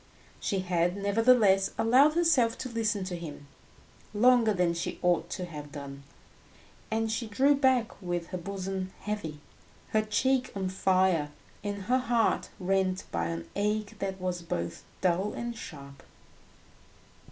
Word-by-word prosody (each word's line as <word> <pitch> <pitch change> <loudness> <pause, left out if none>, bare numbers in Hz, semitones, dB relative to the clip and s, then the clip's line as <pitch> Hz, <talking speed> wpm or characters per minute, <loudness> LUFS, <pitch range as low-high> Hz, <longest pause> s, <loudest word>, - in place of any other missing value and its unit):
She 195 -3 -1
had, 180 0 0
nevertheless, 200 -1 +4
allowed 270 +7 +5
herself 295 -10 +3
to 255 - -5
listen 220 -4 0
to 185 -1 -4
him 155 -4 -8 0.7
longer 240 0 +5
than 180 -3 +2
she 170 - -3
ought 175 -1 +2
to 185 - -4
have 150 -4 -9
done, 140 -2 -8 0.9
and 225 0 0
she 225 +1 -2
drew 265 +7 +4
back 260 -6 +1
with 175 -2 -3
her 185 - -3
bosom 190 0 -4
heavy, 165 -8 -4 0.5
her 215 - +2
cheek 255 +4 +1
on 190 -1 -1
fire, 185 -5 +2 0.3
and 205 -1 -4
her 250 +6 +2
heart 240 -2 +1
rent 190 0 0
by 85 0 -1
an 85 0 -5
ache 210 0 -1
that 190 -1 -3
was 180 -1 -2
both 85 - -4 0.2
dull 185 +3 +1
and 235 0 -4
sharp. 140 -9 -10
195 Hz, 140 wpm, -29 LUFS, 175-225 Hz, 0.9 s, allowed